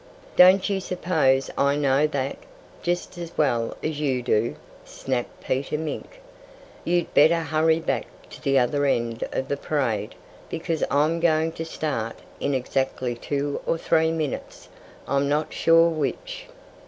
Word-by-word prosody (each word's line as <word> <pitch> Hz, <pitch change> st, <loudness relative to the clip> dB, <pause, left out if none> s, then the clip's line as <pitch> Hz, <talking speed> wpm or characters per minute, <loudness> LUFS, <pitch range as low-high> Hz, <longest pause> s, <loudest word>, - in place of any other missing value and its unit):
"Don't 185 Hz, +1 st, +7 dB
you 200 Hz, -2 st, 0 dB
suppose 160 Hz, -8 st, +1 dB
I 140 Hz, 0 st, +3 dB
know 145 Hz, 0 st, +3 dB
that, 140 Hz, -2 st, -2 dB, 0.5 s
just 175 Hz, 0 st, -2 dB
as 170 Hz, -1 st, -6 dB
well 120 Hz, -6 st, +1 dB
as 155 Hz, -2 st, -2 dB
you 130 Hz, -4 st, 0 dB
do?" 115 Hz, -1 st, +1 dB, 0.3 s
snapped 130 Hz, -2 st, -4 dB
Peter 140 Hz, +3 st, -1 dB
Mink. 160 Hz, -, -6 dB, 0.6 s
"You'd 175 Hz, 0 st, 0 dB
better 165 Hz, +3 st, +5 dB
hurry 160 Hz, +1 st, +2 dB
back 165 Hz, -, -2 dB, 0.2 s
to -, -, -11 dB
the 135 Hz, 0 st, +2 dB
other 140 Hz, +3 st, +2 dB
end 115 Hz, -3 st, 0 dB
of 130 Hz, -, -2 dB
the 140 Hz, -, -1 dB
parade, 120 Hz, -9 st, -1 dB, 0.3 s
because 165 Hz, -1 st, -2 dB
I'm 155 Hz, +4 st, +2 dB
going 160 Hz, -1 st, +2 dB
to 165 Hz, 0 st, -6 dB
start 135 Hz, -8 st, -3 dB, 0.2 s
in 140 Hz, -, 0 dB
exactly 130 Hz, -1 st, -1 dB
two 140 Hz, +4 st, -3 dB
or 165 Hz, -, +1 dB
three 160 Hz, 0 st, +2 dB
minutes 155 Hz, -4 st, -4 dB, 0.4 s
I'm 140 Hz, 0 st, +1 dB
not 150 Hz, +1 st, 0 dB
sure 165 Hz, 0 st, +5 dB
which." -, -, -4 dB
150 Hz, 145 wpm, -24 LUFS, 135-165 Hz, 0.6 s, Don't